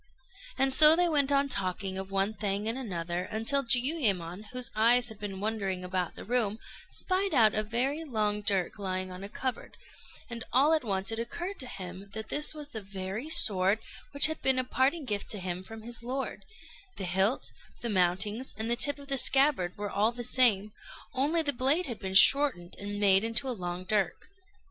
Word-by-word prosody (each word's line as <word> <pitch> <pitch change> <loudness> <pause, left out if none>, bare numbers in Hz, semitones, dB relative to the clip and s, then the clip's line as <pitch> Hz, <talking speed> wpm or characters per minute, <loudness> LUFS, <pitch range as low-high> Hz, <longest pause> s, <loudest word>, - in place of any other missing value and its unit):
And 270 0 +1
so 305 +3 +11
they 355 +1 +2
went 285 -4 +1
on 280 0 +2
talking 190 -4 -3
of 190 0 -6
one 195 +2 -1
thing 205 0 -3
and 225 - -2
another, 180 -7 -5
until 225 +8 -1
Jiuyémon, 230 - 0
whose 250 -1 -4
eyes 240 +3 +3
had 220 -2 -12
been 195 -2 -7
wandering 200 -3 -3
about 180 -1 -4
the - - -10
room, 220 -3 -1 0.3
spied 375 -2 -1
out 220 -4 +4
a 215 - -1
very 250 +8 -2
long 210 -7 -2
dirk 200 -2 -2
lying 185 -1 -4
on 180 +1 -10
a 200 - -7
cupboard, 255 +2 -6 0.5
and 230 -1 -6
all 280 +5 +3
at 315 - 0
once 195 -2 -2
it 225 - -4
occurred 345 +12 -6
to 255 - -5
him 190 -3 -9
that 220 0 -7
this 295 0 +1
was 295 -1 -7
the 220 -6 -6
very 195 +7 -7
sword 195 -8 +3 0.3
which 285 - +7
had 315 0 -2
been 265 -1 +2
a 255 - +1
parting 270 +5 -1
gift 205 -4 -3
to 210 - -1
him 180 -1 -5
from 220 +3 -12
his 235 0 -6
lord: 260 +3 -6 0.5
the - - -5
hilt, 190 +7 0 0.3
the 240 - -3
mountings, 200 +6 +1
and 220 +2 -3
the - - +4
tip 285 +4 +5
of 280 -1 -13
the 275 -1 +2
scabbard 265 -9 +2
were 205 0 -5
all 210 +3 +1
the 240 0 -7
same, 220 -5 +3 0.4
only 295 +6 0
the 285 -2 +1
blade 275 +8 +1
had 235 -4 -6
been 190 -1 -6
shortened 225 -7 +5
and 205 0 -6
made 195 -1 +4
into 230 +4 0
a - - -2
long 180 -5 -6
dirk. 200 - -2
220 Hz, 200 wpm, -28 LUFS, 195-265 Hz, 0.5 s, so